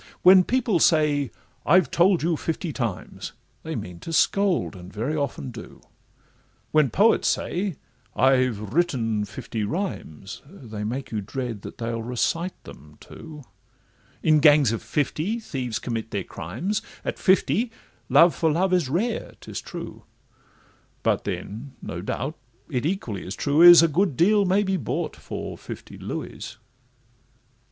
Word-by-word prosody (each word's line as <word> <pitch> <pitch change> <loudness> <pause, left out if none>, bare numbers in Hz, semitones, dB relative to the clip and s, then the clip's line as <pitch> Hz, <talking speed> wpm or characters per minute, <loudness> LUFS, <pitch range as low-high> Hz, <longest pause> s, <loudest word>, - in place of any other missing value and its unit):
When 185 0 +8
people 230 -5 +1
say, 150 -4 +3 0.3
'I've 170 -2 +4
told 180 0 +3
you 170 0 +2
fifty 160 +1 -3
times,' 115 -8 -4 0.3
They - - -5
mean 90 -1 -6
to 165 - -7
scold, 185 - +2
and 90 0 -11
very 120 +9 -2
often 140 -3 -3
do; 110 -2 -11 0.9
When 155 -3 +4
poets 205 - +3
say, 185 -1 -1 0.4
'I've 125 -6 +2
written 120 -11 +1
fifty 105 +2 -5
rhymes,' 100 - -5
They 115 - -8
make 125 +6 -4
you 110 -2 -2
dread 115 0 -5
that - - -9
they'll 115 0 -3
recite 125 +10 -2
them 75 +1 -14
too; 150 -2 -11 0.8
In 155 -1 +5
gangs 145 -5 +6
of 115 - -3
fifty, 155 - -1
thieves 130 - -4
commit 115 -2 -4
their 100 -3 -3
crimes; 205 - -4 0.2
At - - -3
fifty 190 - +2 0.4
love 170 0 +6
for 160 -2 +1
love 185 +4 +1
is 175 -7 +2
rare, 220 - -2
'tis - - -7
true, - - -8 1.0
But - - +1
then, 120 +7 -5
no 85 - -6
doubt, 135 - -3 0.4
it 130 +1 0
equally 125 - -3
as 95 - -5
true 145 +2 +2
is, 175 -1 +10
A - - +5
good 165 -2 0
deal 205 +4 +4
may 190 +3 +3
be 190 -1 0
bought 125 - -3
for - - -7
fifty - - -9
Louis. 110 +2 -6
145 Hz, 145 wpm, -24 LUFS, 115-180 Hz, 1.0 s, is